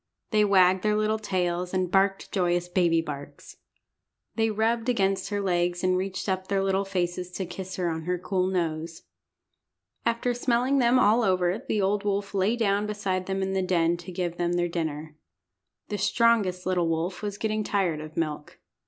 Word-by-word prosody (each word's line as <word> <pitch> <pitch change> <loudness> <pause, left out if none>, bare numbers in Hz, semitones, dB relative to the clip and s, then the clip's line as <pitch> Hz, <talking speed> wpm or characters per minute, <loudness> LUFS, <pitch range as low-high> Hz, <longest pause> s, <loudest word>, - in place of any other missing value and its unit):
They 215 -1 +4
wagged 190 -2 +4
their 210 +1 +1
little 215 0 +1
tails, 180 -3 -1
and 185 -1 0
barked 195 0 +1
joyous 175 -2 +1
baby 175 -2 +2
barks. 145 -2 -9 0.8
They 225 -1 +1
rubbed 225 +2 0
against 195 -4 +1
her 205 -1 -1
legs, 175 -2 0
and 185 0 +3
reached 190 +2 -3
up 190 -1 -1
their 195 0 +1
little 195 0 +1
faces 180 -1 -2
to 190 - -3
kiss 185 +1 -7
her 180 -2 -1
on 160 -1 -3
her 180 0 0
cool 185 +1 -1
nose. 165 -3 -2 1.0
After 235 +1 0
smelling 245 +2 +1
them 245 0 +4
all 230 -1 +4
over 185 -1 +1
the 210 -2 +1
old 200 +1 +1
wolf 200 0 -1
lay 200 +4 +2
down 205 -3 +1
beside 190 -3 -2
them 190 0 -1
in 190 0 -2
the 190 - +1
den 175 -2 +2
to 175 +2 -9
give 175 -1 -3
them 175 0 0
their 175 0 +1
dinner. 155 -2 -4 0.7
The 205 - -3
strongest 210 -5 +2
little 180 -2 +1
wolf 165 +3 -2
was 205 -1 -4
getting 215 0 -1
tired 185 -7 0
of 155 0 -10
milk. 150 -2 -3
185 Hz, 180 wpm, -26 LUFS, 175-205 Hz, 1.0 s, They